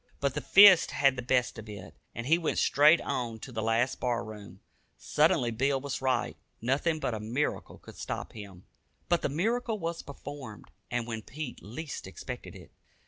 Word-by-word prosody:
But 140 -1 0
the - - -3
fist 195 -3 +8
had 135 -2 +3
the 125 - -4
best 125 -1 0
of 110 -1 -10
it, 100 -2 -9 0.2
and 120 - -5
he 165 +5 +4
went 165 - -1
straight 150 +4 +5
on 120 -3 -3
to 130 - -8
the 110 -2 -3
last 115 +3 +1
bar 120 -2 -1
room. 100 -3 -11 0.4
Surely 150 -5 +2
Bill 135 +4 +1
was 140 0 -4
right. 130 -1 0 0.2
Nothing 145 +7 0
but 125 - -2
a 110 - -3
miracle 120 +8 -2
could - - -14
stop - - -5
him. 100 -4 -11 0.4
But 175 - +3
the - - 0
miracle 225 - 0
was 170 -2 -4
performed, 140 -5 -9 0.2
and 120 -1 -1
when 115 -2 -5
Pete 145 +4 -7
least 140 +8 -7
expected - - -8
it. - - -13
130 Hz, 185 wpm, -29 LUFS, 115-155 Hz, 0.4 s, fist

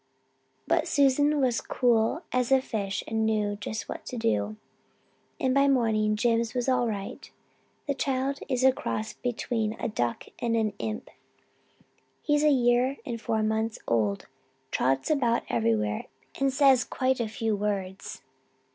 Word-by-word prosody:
But - - +1
Susan 290 +1 +3
was 250 -4 +1
cool 240 +6 +1
as 250 0 0
a 265 - +6
fish 200 -6 -3
and 220 0 0
knew 210 -2 +1
just 215 +2 -5
what - - -6
to 250 - -5
do, 105 - 0 0.8
and 260 -1 +1
by 275 +1 +4
morning 220 -5 +2
Jims 230 +1 +1
was 245 0 -1
all 255 -2 +2
right. 200 -3 -5 0.6
That 280 -1 -2
child 270 +1 0
is 255 0 0
a 265 - +7
cross 215 -4 -4
between 230 -2 -2
a - - -1
duck 120 - -2
and 235 -1 0
an 215 -2 0
imp. 215 0 -4 1.1
He's 295 0 +2
a 305 - +5
year 250 0 +3
and 230 -2 -4
four 220 -2 0
months 220 +1 0
old, 105 -4 0 0.5
trots 135 - +1
about 240 -6 +2
everywhere, 110 -3 0 0.3
and 275 0 +2
says 270 -2 +5
quite 260 0 0
a 235 - 0
few 220 0 -1
words. 200 -2 -4
230 Hz, 150 wpm, -27 LUFS, 210-260 Hz, 1.1 s, a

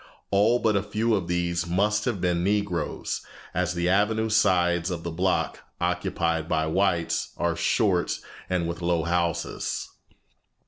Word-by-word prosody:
All 105 +5 +4
but 110 -3 +1
a 100 - +3
few 110 +3 0
of 95 -5 0
these 85 0 0
must 105 +4 +1
have 115 -6 -1
been 85 -1 +1
Negroes, 100 -4 -1 0.3
as 90 0 0
the 85 0 0
avenue 105 +4 +2
sides 90 -5 +3
of 85 -2 -4
the 85 - -3
block, 90 +3 0 0.2
occupied 90 -2 -1
by 80 0 +1
whites, 85 0 0
are - - 0
short - - +1 0.3
and 90 -2 0
with 85 +1 -4
low 85 -1 +1
houses. 85 -1 -1
90 Hz, 145 wpm, -26 LUFS, 85-100 Hz, 0.3 s, All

